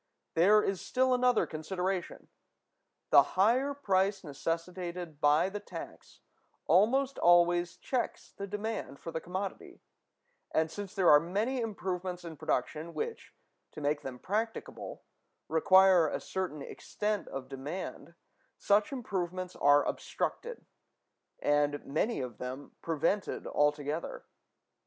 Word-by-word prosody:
There 205 +6 +5
is 195 -2 -1
still 260 0 +2
another 250 -1 +3
consideration: 180 +3 -3 0.8
the 140 - +9 0.2
higher 250 +8 +3
price 195 -6 +1
necessitated 170 +1 -4
by 150 +4 +4
the 205 +2 -4
tax 205 - -10 0.4
almost 265 +8 +3
always 175 0 +4
checks 255 -3 -3
the 200 - -7
demand 210 -7 -4
for 165 - -7
the 160 - -3
commodity; 185 +2 -5 0.7
and, 160 0 +1
since 205 -1 -7
there 190 -3 +5
are 150 - +9
many 205 - -1
improvements 185 -4 -4
in 165 -1 -7
production 155 +4 -2
which, 465 0 -5 0.4
to - - -8
make 145 0 0
them 130 -2 -6
practicable, 220 - -4 0.4
require 185 0 +6
a - - -2
certain 180 -6 -4
extent 210 +6 -3
of 135 -1 -6
demand, 150 +5 -6 0.4
such 205 +4 +2
improvements 185 -7 -3
are 145 0 +5
obstructed, 475 -1 -3 0.8
and 145 0 +1
many 160 - 0
of 125 -4 -6
them 130 +3 -6
prevented 165 +5 -1
altogether. 150 +2 -1
180 Hz, 120 wpm, -31 LUFS, 155-205 Hz, 0.8 s, the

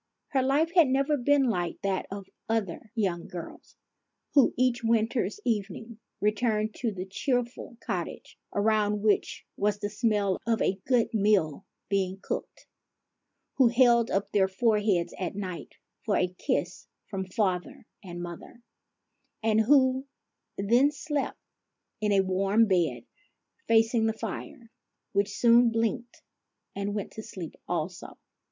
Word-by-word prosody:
Her 270 - +2
life 285 +5 +2
had 340 -5 +6
never 275 +3 +2
been 285 +1 +3
like 180 -9 -1
that 195 -1 -1
of 200 0 -6 0.2
other 220 -1 -2
young 185 -6 -1
girls, 175 -2 -9 0.6
who 280 -3 +5
each 250 0 +1
winter's 225 -2 +1
evening 220 0 -3 0.2
returned 215 0 +1
to 235 -3 0
the 185 -2 -5
cheerful 240 +4 -2
cottage, 180 -6 -4 0.2
around 210 0 +1
which 210 -2 +1
was 205 0 +1
the 205 0 -4
smell 210 -4 +1
of 225 -1 +2
a 190 - 0
good 245 -3 +2
meal 200 -6 +2 0.2
being 190 -1 0
cooked; - - -5 0.9
who 260 -3 +6
held 235 -1 +4
up 195 +1 -1
their 195 -2 +3
foreheads 210 -3 +1
at 185 0 -3
night 185 -4 -6 0.3
for 210 - +1
a 180 0 0
kiss - - -2 0.2
from 195 -3 -4
father 185 0 -2 0.2
and 175 -2 -7
mother; 175 +7 -9 0.8
and 220 0 +3
who 260 +2 +3 0.5
then 235 +8 +4
slept 295 -1 -3 0.6
in 210 -1 0
a 195 -1 +5
warm 195 +4 +2
bed, 185 0 0 0.6
facing 225 0 +3
the 220 - +1
fire, 235 +1 -7 0.4
which 200 +1 +1
soon 235 0 +6
blinked, 230 +1 -2 0.5
and 200 +1 -3
went 205 - -4
to 220 - -7
sleep 190 -7 -8
also. 175 +3 -4
215 Hz, 135 wpm, -28 LUFS, 195-235 Hz, 0.9 s, had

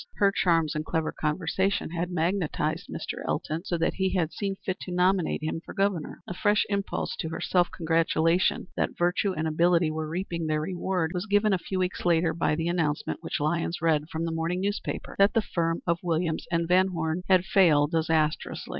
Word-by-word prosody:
Her 200 -1 +3
charms 165 -5 +2
and 155 - -2
clever 160 0 -1
conversation 165 +5 -1
had 175 +1 -2
magnetized 170 -1 -1
Mr. - - -5
Elton 160 +3 -2
so 175 - -1
that 165 - +1
he 190 0 0
had 165 -3 0
seen 195 -2 -2
fit 190 -1 -4
to 180 - -7
nominate 180 -2 +1
him 160 +1 -2
for - - -10
Governor. 195 -4 -1
A - - -4
fresh 205 +3 +2
impulse 200 -1 -2
to 160 - -3
her 165 - -5
self 175 -1 +2
congratulation 165 +1 +1
that - - -1
virtue 175 +3 +1
and 160 0 -2
ability 170 +1 +3
were 155 0 -3
reaping 170 -1 -3
their 155 -1 0
reward 180 0 -1
was 180 +3 -3
given 205 0 +3
a 185 - +1
few 185 +2 -4
weeks 185 0 -1
later 165 -1 +3
by 165 -2 +1
the 165 +1 -2
announcement 160 -4 -1
which - - -3
Lyons 165 +3 -1
read 155 -2 +1
from 165 0 -3
the 165 - -2
morning 165 +3 -1
newspaper 205 +1 -3
that 200 +1 +5
the 225 - +4
firm 165 -2 -1
of 170 -1 +1
Williams 165 -2 -1
& - - -18
Van 180 +2 +3
Horne 165 -1 -2
had 185 -1 +5
failed 160 -7 +4
disastrously. 160 -2 0
170 Hz, 200 wpm, -27 LUFS, 160-185 Hz, -, that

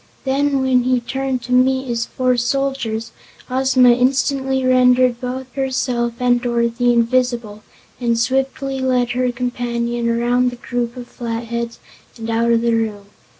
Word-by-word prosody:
Then 275 0 +1
when 255 -1 +3
he 255 0 +1
turned 265 +1 -3
to 250 - -8
meet 260 +1 +3
his 235 -2 -2
four 255 -1 0
soldiers, 245 -3 -2 0.4
Ozma 260 -1 +4
instantly 265 +1 +1
rendered 250 -1 +4
both 255 0 -5
herself 255 -3 -1
and 245 -1 +2
Dorothy 235 0 +1
invisible 235 -2 0 0.4
and 235 -2 +1
swiftly 270 +2 -1
led 250 -2 +1
her 250 0 0
companion 240 -1 -2
around 240 +2 +2
the 245 - -8
group 245 0 -4
of 245 -1 -8
Flatheads 235 0 -4 0.4
and 225 -1 -6
out 230 +1 +2
of 230 0 +3
the 235 0 +1
room. 210 -3 -2
245 Hz, 145 wpm, -19 LUFS, 235-260 Hz, 0.4 s, Ozma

